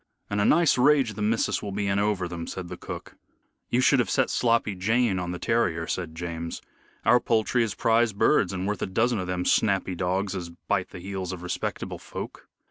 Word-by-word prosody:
"And 100 Hz, 0 st, +1 dB
a -, -, +3 dB
nice 160 Hz, -5 st, +4 dB
rage 135 Hz, -4 st, +4 dB
the 105 Hz, -, -6 dB
missus 110 Hz, +2 st, +1 dB
will 100 Hz, -, -5 dB
be 100 Hz, +1 st, -2 dB
in 100 Hz, 0 st, +1 dB
over 100 Hz, -3 st, 0 dB
them," 85 Hz, -1 st, -6 dB
said 90 Hz, -2 st, -6 dB
cook. -, -, -8 dB, 0.5 s
"You 125 Hz, -, +2 dB
should 135 Hz, +1 st, +4 dB
have 120 Hz, -, +1 dB
set 130 Hz, -2 st, +2 dB
Sloppy 115 Hz, -3 st, +2 dB
Jane 105 Hz, +1 st, +1 dB
on 90 Hz, -1 st, -3 dB
the 90 Hz, -, -4 dB
terrier," 90 Hz, -7 st, 0 dB
said 80 Hz, -2 st, -4 dB
James. 85 Hz, 0 st, -5 dB, 0.5 s
"Our 125 Hz, -, +6 dB
poultry 115 Hz, +1 st, +1 dB
is 110 Hz, -3 st, -3 dB
prize 115 Hz, 0 st, +3 dB
birds 100 Hz, -2 st, +3 dB
and 95 Hz, -1 st, -3 dB
worth 105 Hz, -1 st, -2 dB
a -, -, -1 dB
dozen 115 Hz, +4 st, +1 dB
of 90 Hz, -, -3 dB
them 90 Hz, -1 st, -2 dB
snappy 95 Hz, -3 st, +2 dB
dogs 95 Hz, +3 st, -1 dB
as 90 Hz, -2 st, -5 dB
bite 90 Hz, +2 st, -2 dB
the -, -, -10 dB
heels 95 Hz, 0 st, -5 dB
of 90 Hz, -2 st, -7 dB
respectable 90 Hz, -, -4 dB
folk." -, -, -8 dB
100 Hz, 210 wpm, -26 LUFS, 90-115 Hz, 0.5 s, Our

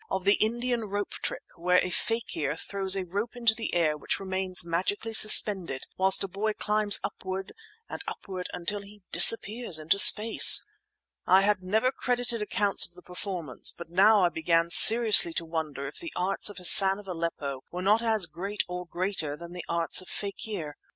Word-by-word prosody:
—of 190 Hz, -1 st, -5 dB
the 200 Hz, -, +4 dB
Indian 240 Hz, +1 st, -3 dB
rope 205 Hz, 0 st, -6 dB
trick, -, -, -7 dB
where 180 Hz, +1 st, 0 dB
a 180 Hz, -, -6 dB
fakir 165 Hz, -10 st, -4 dB
throws 195 Hz, +2 st, -2 dB
a 190 Hz, -1 st, -5 dB
rope 205 Hz, +7 st, -6 dB
into 235 Hz, -2 st, +1 dB
the 225 Hz, -4 st, -6 dB
air 160 Hz, -3 st, 0 dB
which 150 Hz, -, -3 dB
remains 190 Hz, -2 st, -4 dB
magically 190 Hz, +6 st, -4 dB
suspended 195 Hz, -10 st, +5 dB
whilst 190 Hz, +1 st, +2 dB
a -, -, -5 dB
boy 205 Hz, +3 st, -4 dB
climbs 210 Hz, -1 st, +1 dB
upward 190 Hz, 0 st, -7 dB, 0.3 s
and -, -, -9 dB
upward 185 Hz, -2 st, -8 dB
until 200 Hz, +4 st, -6 dB
he 200 Hz, 0 st, -18 dB
disappears 225 Hz, -4 st, +2 dB
into 160 Hz, +5 st, -1 dB
space. 220 Hz, +3 st, +6 dB, 0.6 s
I 190 Hz, +2 st, +4 dB
had 205 Hz, -1 st, -1 dB
never 220 Hz, +7 st, -1 dB
credited 245 Hz, -3 st, -4 dB
accounts 205 Hz, -1 st, 0 dB
of 175 Hz, -, -24 dB
the 180 Hz, -, -17 dB
performance; 180 Hz, -, -4 dB
but 170 Hz, -1 st, -12 dB
now 200 Hz, +3 st, +3 dB
I 175 Hz, -, +2 dB
began 165 Hz, +1 st, -2 dB
seriously 220 Hz, -4 st, +6 dB
to 170 Hz, -, -3 dB
wonder 155 Hz, -4 st, -6 dB
if -, -, -10 dB
the 335 Hz, -2 st, -9 dB
arts 195 Hz, +3 st, 0 dB
of 205 Hz, -, -12 dB
Hassan 190 Hz, +1 st, +8 dB
of 205 Hz, -1 st, -14 dB
Aleppo 165 Hz, -6 st, -6 dB
were 180 Hz, +1 st, -8 dB
not 210 Hz, +4 st, +1 dB
as 220 Hz, -5 st, -1 dB
great 185 Hz, +6 st, -6 dB
or 180 Hz, 0 st, -8 dB
greater 175 Hz, -5 st, -4 dB
than 170 Hz, +1 st, -12 dB
the 180 Hz, -1 st, -9 dB
arts 170 Hz, +1 st, +1 dB
of 185 Hz, -, -13 dB
fakir. 200 Hz, -6 st, -7 dB
190 Hz, 180 wpm, -25 LUFS, 170-210 Hz, 0.6 s, Hassan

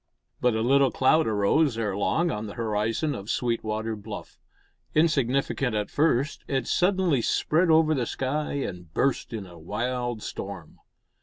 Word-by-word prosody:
But 125 Hz, -2 st, +2 dB
a 110 Hz, -, 0 dB
little 135 Hz, +2 st, +4 dB
cloud 145 Hz, +3 st, +3 dB
arose 110 Hz, +6 st, +2 dB
ere 105 Hz, -4 st, -1 dB
long 165 Hz, -, +1 dB
on 105 Hz, +1 st, -4 dB
the 100 Hz, -, -8 dB
horizon 115 Hz, +6 st, -1 dB
of 100 Hz, +1 st, -7 dB
Sweetwater 110 Hz, -2 st, -1 dB
Bluff. 105 Hz, +1 st, -9 dB, 0.6 s
Insignificant 135 Hz, -5 st, +1 dB
at 105 Hz, -1 st, -2 dB
first, 145 Hz, -2 st, +1 dB
it 135 Hz, -3 st, -1 dB
suddenly 180 Hz, -7 st, +2 dB
spread 165 Hz, +8 st, +2 dB
over 160 Hz, 0 st, +5 dB
the 125 Hz, -5 st, -1 dB
sky 145 Hz, +3 st, -2 dB
and 90 Hz, -, -5 dB
burst 135 Hz, -2 st, 0 dB
in 110 Hz, -4 st, -5 dB
a 85 Hz, -2 st, -13 dB
wild 120 Hz, +5 st, -3 dB
storm. 95 Hz, -5 st, -7 dB
120 Hz, 150 wpm, -26 LUFS, 105-145 Hz, 0.6 s, over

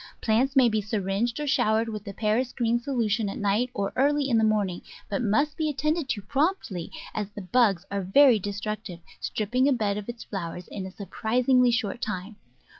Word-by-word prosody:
Plants 245 Hz, +5 st, +1 dB
may 260 Hz, -2 st, +6 dB
be 215 Hz, -2 st, +1 dB
syringed, 210 Hz, +4 st, -1 dB
or 300 Hz, -, -2 dB
showered 220 Hz, -4 st, +2 dB
with 215 Hz, -2 st, -5 dB
the 200 Hz, -, -5 dB
Paris 230 Hz, +4 st, 0 dB
green 235 Hz, -1 st, +1 dB
solution 235 Hz, -5 st, 0 dB
at -, -, -5 dB
night 210 Hz, +5 st, +1 dB
or 200 Hz, -4 st, -3 dB
early 285 Hz, +1 st, +2 dB
in 235 Hz, -4 st, +3 dB
the -, -, +2 dB
morning, 205 Hz, -5 st, +1 dB, 0.3 s
but 200 Hz, -, 0 dB
must 280 Hz, +7 st, +1 dB
be 315 Hz, -1 st, 0 dB
attended 305 Hz, +1 st, -1 dB
to 215 Hz, -5 st, -2 dB
promptly, 270 Hz, -, -1 dB, 0.2 s
as 210 Hz, -2 st, -3 dB
the 205 Hz, 0 st, -8 dB
bugs 195 Hz, -3 st, +2 dB
are 200 Hz, 0 st, -1 dB
very 230 Hz, +5 st, +5 dB
destructive, 205 Hz, -2 st, -5 dB, 0.2 s
stripping 250 Hz, +5 st, 0 dB
a -, -, +4 dB
bed 210 Hz, -4 st, 0 dB
of 210 Hz, -, -9 dB
its 235 Hz, -1 st, -6 dB
flow 175 Hz, -5 st, -5 dB
ers 180 Hz, -, -9 dB
in 190 Hz, -2 st, -6 dB
a -, -, -9 dB
surprisingly 245 Hz, +6 st, +2 dB
short 235 Hz, -1 st, -1 dB
time. 210 Hz, -3 st, -4 dB
220 Hz, 195 wpm, -26 LUFS, 200-250 Hz, 0.3 s, may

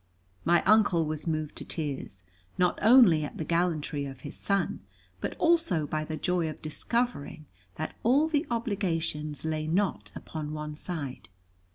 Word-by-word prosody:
My 170 Hz, 0 st, +4 dB
Uncle 205 Hz, -6 st, +4 dB
was 155 Hz, +1 st, -4 dB
moved 155 Hz, -2 st, -2 dB
to -, -, -6 dB
tears, 135 Hz, -, -4 dB, 0.3 s
not 180 Hz, -1 st, +2 dB
only 215 Hz, -9 st, +7 dB
at 145 Hz, -, -6 dB
the 160 Hz, -, -3 dB
gallantry 160 Hz, -4 st, 0 dB
of 135 Hz, -1 st, -8 dB
his -, -, -7 dB
son, 200 Hz, -3 st, 0 dB, 0.4 s
but -, -, -3 dB
also 325 Hz, -, +3 dB
by 155 Hz, +1 st, -2 dB
the 155 Hz, 0 st, -4 dB
joy 175 Hz, -2 st, 0 dB
of 155 Hz, -, -8 dB
discovering 160 Hz, -2 st, -2 dB, 0.3 s
that 155 Hz, -, -4 dB
all 275 Hz, +7 st, +4 dB
the 310 Hz, 0 st, 0 dB
obligations 165 Hz, -, -2 dB
lay 155 Hz, -1 st, -1 dB
not 190 Hz, +4 st, 0 dB
upon 155 Hz, -1 st, -6 dB
one 150 Hz, 0 st, -4 dB
side. 150 Hz, -, -5 dB
160 Hz, 155 wpm, -29 LUFS, 150-200 Hz, 0.4 s, only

